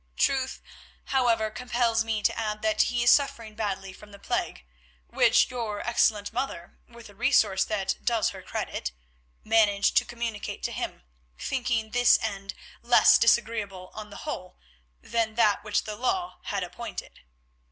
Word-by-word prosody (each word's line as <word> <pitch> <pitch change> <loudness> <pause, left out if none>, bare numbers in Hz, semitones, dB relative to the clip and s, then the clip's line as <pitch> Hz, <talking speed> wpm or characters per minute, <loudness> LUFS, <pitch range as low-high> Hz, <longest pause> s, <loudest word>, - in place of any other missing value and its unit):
Truth, 265 -1 0 0.5
however, 230 -4 +2
compels 235 -1 0
me 220 -2 -2
to - - +2
add 215 -1 -3
that 215 -1 +2
he 240 -1 +1
is 240 - +6
suffering 230 -6 +1
badly 195 -3 -4
from 210 +2 -15
the 200 - -12
plague, - - -3 0.4
which 255 - +3
your 225 -4 -3
excellent 220 -3 +2
mother, 235 -8 -5
with 235 -1 -13
a 205 - -15
resource 210 -4 +3
that 205 -3 -1
does 230 -3 +2
her - - -9
credit, 60 -1 -4 0.5
managed 210 -2 +3
to - - +5
communicate 235 -3 -5
to - - -1
him, - - -5 0.3
thinking 235 -4 -2
this 245 0 +5
end 200 -2 -4 0.3
less 240 +1 +6
disagreeable 215 -5 +1
on 215 -1 -8
the 205 - -10
whole 185 -12 -6 0.5
than 225 -2 -1
that 215 -3 +3
which 210 - 0
the 215 - -6
law 355 - -2
had 200 -2 -2
appointed." 180 +7 -8
220 Hz, 150 wpm, -27 LUFS, 205-240 Hz, 0.5 s, is